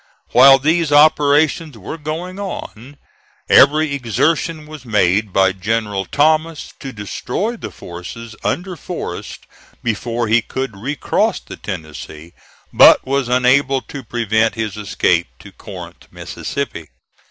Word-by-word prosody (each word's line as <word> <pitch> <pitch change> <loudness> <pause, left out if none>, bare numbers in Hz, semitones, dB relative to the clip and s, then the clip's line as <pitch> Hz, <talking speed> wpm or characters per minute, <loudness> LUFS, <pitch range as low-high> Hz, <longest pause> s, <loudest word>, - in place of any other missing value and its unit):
While 135 +2 +8
these 160 +3 +1
operations 150 0 +3
were 110 - -8
going 170 +5 -5
on, 145 - -7 0.5
every 150 +1 +5
exertion 155 - -1
was 155 -3 -11
made 105 -2 +1
by 95 0 +3
General 105 0 -2
Thomas 155 - 0
to 135 - -7
destroy 125 - -4
the - - -7
forces 110 +7 -9
under 180 +1 -2
Forrest 160 - -7 0.4
before 115 +1 -2
he 115 +2 +3
could 130 0 -5
recross 135 +9 -1
the - - -11
Tennessee, 75 +2 -8 0.4
but - - +7
was 135 -1 -1
unable 130 +2 +3
to 140 - -9
prevent 110 -2 0
his 110 -3 -3
escape 90 -4 0
to - - -14
Corinth, - - -11
Mississippi. 135 - -6
130 Hz, 120 wpm, -18 LUFS, 105-150 Hz, 0.5 s, While